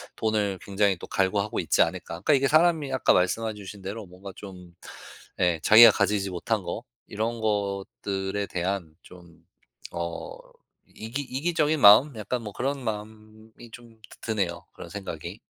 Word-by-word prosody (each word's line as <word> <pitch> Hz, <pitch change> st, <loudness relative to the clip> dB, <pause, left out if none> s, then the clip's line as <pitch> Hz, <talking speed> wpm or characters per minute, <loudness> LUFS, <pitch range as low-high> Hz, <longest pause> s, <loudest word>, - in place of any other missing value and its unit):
'돈을 105 Hz, -3 st, -1 dB
굉장히 100 Hz, 0 st, +1 dB
또 -, -, -9 dB
갈구하고 100 Hz, +2 st, 0 dB
있지 -, -, +2 dB
않을까.' 90 Hz, +2 st, 0 dB, 0.2 s
그러니까 145 Hz, -, +3 dB
이게 135 Hz, -1 st, +3 dB
사람이 155 Hz, -2 st, +3 dB
아까 130 Hz, -, +2 dB
말씀해 110 Hz, +5 st, 0 dB
주신 100 Hz, -1 st, -10 dB
대로 100 Hz, +3 st, -6 dB
뭔가 95 Hz, +2 st, -11 dB
좀 90 Hz, -3 st, -11 dB, 0.7 s
예 90 Hz, -2 st, +2 dB
자기가 110 Hz, +3 st, +9 dB
가지지 100 Hz, -1 st, 0 dB
못한 90 Hz, -2 st, -2 dB
거 -, -, -5 dB, 0.2 s
이런 110 Hz, +2 st, -3 dB
것들에 100 Hz, -1 st, -2 dB
대한 90 Hz, -3 st, -3 dB
좀 85 Hz, -2 st, -17 dB, 0.5 s
어 85 Hz, -1 st, -5 dB, 0.5 s
이기 115 Hz, +6 st, -6 dB
이기적인 155 Hz, +3 st, 0 dB
마음? 115 Hz, +7 st, +7 dB
약간 110 Hz, +4 st, -3 dB
뭐 105 Hz, -2 st, -7 dB
그런 135 Hz, +3 st, -3 dB
마음이 110 Hz, +1 st, -8 dB
좀 115 Hz, -1 st, -14 dB
드 -, -, -15 dB
드네요, 95 Hz, -6 st, -2 dB
그런 -, -, -10 dB
생각이. 95 Hz, 0 st, -7 dB
105 Hz, 315 characters per minute, -26 LUFS, 95-115 Hz, 0.7 s, 자기가